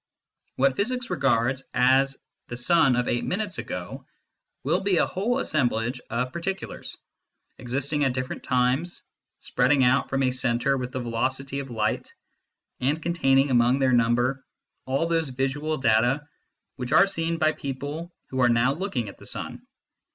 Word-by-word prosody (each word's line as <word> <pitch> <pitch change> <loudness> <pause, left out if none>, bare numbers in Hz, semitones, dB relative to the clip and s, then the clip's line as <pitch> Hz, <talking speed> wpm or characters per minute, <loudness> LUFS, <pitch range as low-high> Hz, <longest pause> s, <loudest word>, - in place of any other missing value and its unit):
What 135 0 +2
physics 245 +2 -1
regards 130 -4 +1
as 135 +2 +3 0.3
the 120 - -6
sun 145 0 +4
of 125 0 0
eight 120 - 0
minutes 200 +1 -2
ago - - -6 0.6
will - - +1
be 195 -2 +2
a - - +4
whole 225 +7 -1
assemblage 120 - 0
of 125 +2 -2
particulars, 190 +3 -5 0.6
existing 140 +4 -1
at 135 -2 +2
different 130 -1 -4
times, 130 +7 0 0.4
spreading 145 -3 +2
out 125 +2 +3
from 135 0 0
a 130 - +2
centre 125 +1 +1
with 125 -1 -4
the 130 - -3
velocity 130 +3 -2
of 135 -1 -6
light, 110 -2 -2 0.6
and 140 +5 0
containing 140 -5 +2
among 120 +1 +4
their 130 -2 +2
number 120 +3 +2 0.4
all 135 +5 +1
those 165 -3 0
visual 135 +4 -2
data 125 +4 +2 0.5
which 125 -1 -5
are 195 - +7
seen 165 -3 -1
by 155 -1 +3
people 145 +4 -5 0.2
who 130 - -3
are 120 - +5
now 120 +3 +3
looking 155 - -3
at 100 - -10
the - - -9
sun. - - -4
135 Hz, 155 wpm, -25 LUFS, 125-155 Hz, 0.6 s, are